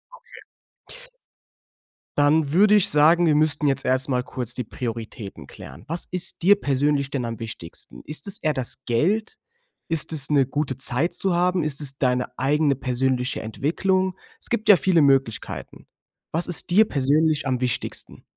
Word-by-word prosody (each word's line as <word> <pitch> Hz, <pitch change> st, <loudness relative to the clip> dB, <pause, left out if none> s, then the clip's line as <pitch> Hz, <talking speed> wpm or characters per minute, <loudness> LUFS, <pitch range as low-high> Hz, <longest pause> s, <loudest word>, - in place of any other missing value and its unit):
Okay. -, -, -16 dB, 1.8 s
Dann 145 Hz, 0 st, +2 dB
würde 205 Hz, +5 st, +5 dB
ich 205 Hz, -, +3 dB
sagen, 160 Hz, +4 st, +4 dB
wir 155 Hz, -2 st, +3 dB
müssten 150 Hz, 0 st, +2 dB
jetzt 135 Hz, -, -1 dB
erst 130 Hz, +2 st, +1 dB
mal 125 Hz, -1 st, 0 dB
kurz 125 Hz, -2 st, -5 dB
die 125 Hz, -, -4 dB
Prioritäten 115 Hz, -2 st, -7 dB
klären. 65 Hz, +5 st, -13 dB
Was 165 Hz, +2 st, -2 dB
ist 180 Hz, -1 st, -3 dB
dir 200 Hz, +4 st, +6 dB
persönlich 140 Hz, 0 st, 0 dB
denn 125 Hz, -4 st, -2 dB
am 115 Hz, 0 st, -6 dB
wichtigsten? 85 Hz, -, -9 dB
Ist 150 Hz, +3 st, -5 dB
es 200 Hz, -, 0 dB
eher 155 Hz, -1 st, 0 dB
das 130 Hz, -1 st, -2 dB
Geld? 185 Hz, -, 0 dB, 0.5 s
Ist 165 Hz, 0 st, +2 dB
es 140 Hz, -2 st, +5 dB
'ne 140 Hz, -3 st, +3 dB
gute 135 Hz, -1 st, -3 dB
Zeit 135 Hz, +5 st, +1 dB
zu 190 Hz, -3 st, +1 dB
haben? 180 Hz, -1 st, +1 dB
Ist 150 Hz, -1 st, +1 dB
es 135 Hz, -2 st, -1 dB
deine 125 Hz, -1 st, 0 dB
eigene 145 Hz, +1 st, +1 dB
persönliche 130 Hz, 0 st, -1 dB
Entwicklung? 185 Hz, -, -1 dB, 0.3 s
Es -, -, -7 dB
gibt 220 Hz, -2 st, -2 dB
ja 195 Hz, -, +9 dB
viele 175 Hz, -4 st, +2 dB
Möglichkeiten. 135 Hz, -5 st, -1 dB, 0.4 s
Was 165 Hz, +2 st, 0 dB
ist 175 Hz, -, -2 dB
dir 215 Hz, +5 st, +5 dB
persönlich 145 Hz, +1 st, +1 dB
am 130 Hz, -2 st, -1 dB
wichtigsten? 125 Hz, -2 st, -4 dB
145 Hz, 165 wpm, -23 LUFS, 130-165 Hz, 1.8 s, ja